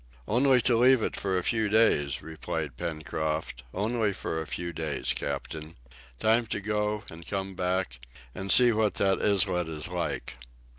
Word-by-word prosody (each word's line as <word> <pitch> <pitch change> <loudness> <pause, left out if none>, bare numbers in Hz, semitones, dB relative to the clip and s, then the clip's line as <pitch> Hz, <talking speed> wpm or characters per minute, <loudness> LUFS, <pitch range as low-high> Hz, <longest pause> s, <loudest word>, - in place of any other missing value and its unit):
"Only 125 +2 +4
to 120 0 +3
leave 125 0 +5
it - - -2
for 95 -2 -1
a 90 - -1
few 110 0 +1
days," 100 -10 +3
replied 80 -3 -4
Pencroft, 80 0 -3
"only 110 - 0
for 80 -3 -3
a 80 - -7
few 85 +3 -4
days, 80 -3 -1
captain. 75 +3 -5 0.4
Time 115 +2 +3
to - - -2
go 105 0 -1
and 80 0 -11
come 95 -1 -3
back, 90 -8 -2 0.3
and 95 +1 -2
see 125 -1 +8
what 110 -2 +1
that 95 -1 +2
islet 95 -4 +2
is 75 -2 -5
like!" - - -3
95 Hz, 160 wpm, -28 LUFS, 80-110 Hz, 0.4 s, see